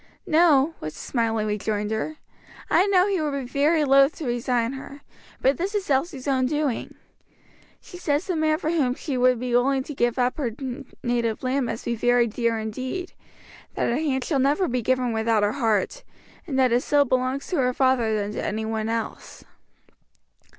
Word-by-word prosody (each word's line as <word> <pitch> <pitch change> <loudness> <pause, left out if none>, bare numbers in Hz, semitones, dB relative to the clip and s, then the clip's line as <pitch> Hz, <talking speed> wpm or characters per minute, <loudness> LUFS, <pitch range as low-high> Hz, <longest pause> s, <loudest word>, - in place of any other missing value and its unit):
"No," 315 -2 +4
was 155 0 -6
the - - -11
smiling 225 -3 -1
rejoinder; 210 +6 -2 0.6
"I 380 - +4
know 375 -2 +4
he 390 -4 0
would 290 -2 -1
be 265 - -5
very 295 +5 +2
loath 275 +1 +5
to 315 - -6
resign 240 0 0
her; 275 +1 -9 0.4
but 265 0 +3
this 390 +4 -2
is 400 -2 -1
Elsie's 275 0 -1
own 260 -2 +2
doing. 295 -3 -2 0.8
She 355 - -12
says 295 -1 0
the 370 - -2
man 310 -1 +2
for 315 - -2
whom 270 -7 +1
she 280 -2 -4
would 250 -1 +3
be 250 0 -3
willing 265 +2 +2
to 295 - -7
give 240 -2 0
up 250 0 +1
her 240 -7 -2 0.5
native 235 -2 -1
land 255 0 0
must 230 0 -5
be 235 - 0
very 245 +1 +3
dear 230 0 -1
indeed, 255 - -5 0.6
that - - 0
her 235 - +1
hand 270 -5 0
shall 280 -1 0
never 285 +8 +2
be 250 0 -1
given 250 0 0
without 220 -1 +1
her 205 - +2
heart, 235 - 0 0.4
and 275 -5 -2
that 260 -2 +3
it 240 +1 +3
still 290 +1 +3
belongs 255 +5 -1
more 330 - +2
to 250 - +2
her 250 - 0
father 255 -5 +2
than 205 -1 -2
to - - -4
any 220 +1 -2
one 220 0 -2
else." 225 -1 -5
255 Hz, 190 wpm, -24 LUFS, 230-290 Hz, 0.8 s, loath